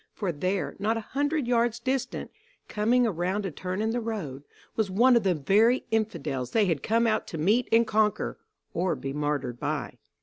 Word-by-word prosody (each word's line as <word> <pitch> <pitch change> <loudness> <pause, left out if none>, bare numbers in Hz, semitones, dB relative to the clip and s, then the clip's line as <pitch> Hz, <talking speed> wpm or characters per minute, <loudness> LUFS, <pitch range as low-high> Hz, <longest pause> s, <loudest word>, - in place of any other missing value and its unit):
For 195 -5 -1
there, 185 +5 -2
not 220 +3 +1
a 225 - -7
hundred 290 +1 0
yards 235 -1 +2
distant, 255 +1 -2 0.4
coming 235 +4 +2
around 190 0 -1
a 190 - -3
turn 185 +6 -3
in 220 - 0
the 240 - -1
road, 185 - -4 0.3
was 220 -3 0
one 240 +7 +5
of 235 - +5
the 190 -3 +2
very 210 - +3
Infidels 155 - -1
they 220 -2 +4
had 165 -6 0
come 230 +2 +2
out 220 -1 +1
to 165 - -6
meet 210 +10 +2
and 230 +1 +5
conquer, 215 -1 0 0.3
or 175 -1 0
be 135 0 -5
martyred 145 -5 -2
by. - - -3
210 Hz, 190 wpm, -27 LUFS, 170-230 Hz, 0.4 s, one